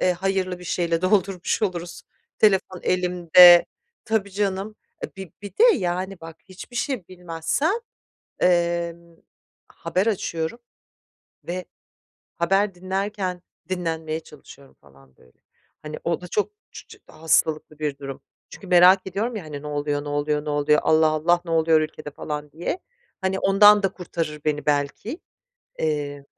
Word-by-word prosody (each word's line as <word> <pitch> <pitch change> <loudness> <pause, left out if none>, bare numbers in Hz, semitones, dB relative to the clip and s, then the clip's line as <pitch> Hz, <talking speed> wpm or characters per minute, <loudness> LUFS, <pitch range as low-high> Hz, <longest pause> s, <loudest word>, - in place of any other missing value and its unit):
eee, 180 - +3
hayırlı 185 0 -2
bir 180 - -12
şeyle 170 -1 -1
doldurmuş 190 +1 +1
oluruz, 175 -3 -3 0.4
telefon 190 -3 +2
elimde 180 -1 +7 0.4
Tabii, 220 -3 -1
canım. 200 +1 -2 0.3
E, - - -8
bi 190 -3 -9
bir 205 - -7
de, 435 - 0
yani, 185 0 -3
bak, 165 0 -10
hiçbir 190 +6 -11
şey 245 -8 -2
bilmezsem, 175 - -2 0.7
emm, 170 -1 0 0.5
haber 190 +4 -2
açıyorum 170 -1 -2 0.9
ve 180 +1 -4 0.7
haber 195 +3 +1
dinlerken 190 0 -3 0.3
dinlenmeye 160 -3 -3
çalışıyorum 140 -3 -16
falan 70 -2 -22
böyle. - - -24 0.4
Hani, 155 0 -7
o 170 0 -1
da 180 - -8
çok 210 - -1 0.2
çu - - -11
çı 435 -2 -15
hastalıklı 155 -1 0
bir 150 -2 -2
durum. 135 -1 -8 0.3
Çünkü 195 - -12
merak 180 +2 +6
ediyorum 215 +6 -2
ya, 205 - -5
hani, 145 -2 -8
"Ne 150 - -8
oluyor, 145 0 -2
ne 145 - -6
oluyor, 150 +1 -1
ne 150 - -3
oluyor? 145 +1 +3
Allah, 160 0 +4
Allah! 160 +3 +2
Ne 170 - -5
oluyor 160 -1 +4
ülkede?" 155 -1 -6
falan 150 0 -6
diye, 170 - -4 0.4
hani, 190 0 -1
ondan 205 +1 +6
da 195 - +3
kurtarır 165 -4 -5
beni 150 -1 -1
belki. 150 - -1 0.6
Eee, 145 -2 -2
175 Hz, 145 wpm, -23 LUFS, 155-190 Hz, 0.9 s, elimde